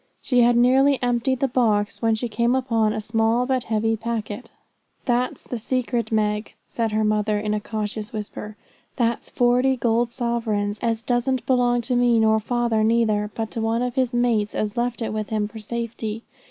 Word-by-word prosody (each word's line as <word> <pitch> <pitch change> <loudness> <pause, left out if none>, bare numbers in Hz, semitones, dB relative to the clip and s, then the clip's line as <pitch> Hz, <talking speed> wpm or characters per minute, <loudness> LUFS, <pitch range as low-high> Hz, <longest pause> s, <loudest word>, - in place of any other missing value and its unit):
She 250 -2 +2
had 240 0 +4
nearly 265 +3 +4
emptied 245 +1 0
the 275 - +3
box, 220 -5 +1
when 225 -1 +2
she 240 +2 -3
came 235 +2 +1
upon 230 -5 +1
a 215 - -2
small 225 +3 +1
but 255 -2 0
heavy 225 0 +1
packet. 225 0 -4 0.6
'That's 245 0 0
the 245 - -5
secret, 240 -1 -1
Meg,' 210 -1 0
said 225 -2 -2
her 215 0 +1
mother 215 0 +1
in 210 0 -1
a 210 - 0
cautious 215 0 -4
whisper. 210 -1 -7 0.4
'That's 235 -2 -1
forty 250 +2 +2
gold 235 0 +1
sovereigns, 225 -4 -1
as 230 -1 -1
doesn't 245 0 0
belong 245 -2 +2
to 245 +2 -2
me, 245 -1 +4
nor 220 0 +4
father 235 -1 0
neither, 215 -2 +2
but 225 -1 -3
to 225 - -3
one 225 +2 0
of 250 -1 -2
his 255 -2 +1
mates 235 -4 +1
as 210 -1 -2
left 240 0 -1
it 220 - -3
with 215 -1 -3
him 215 -1 0
for 220 +1 -10
safety. 225 0 -4
230 Hz, 185 wpm, -23 LUFS, 215-245 Hz, 0.6 s, had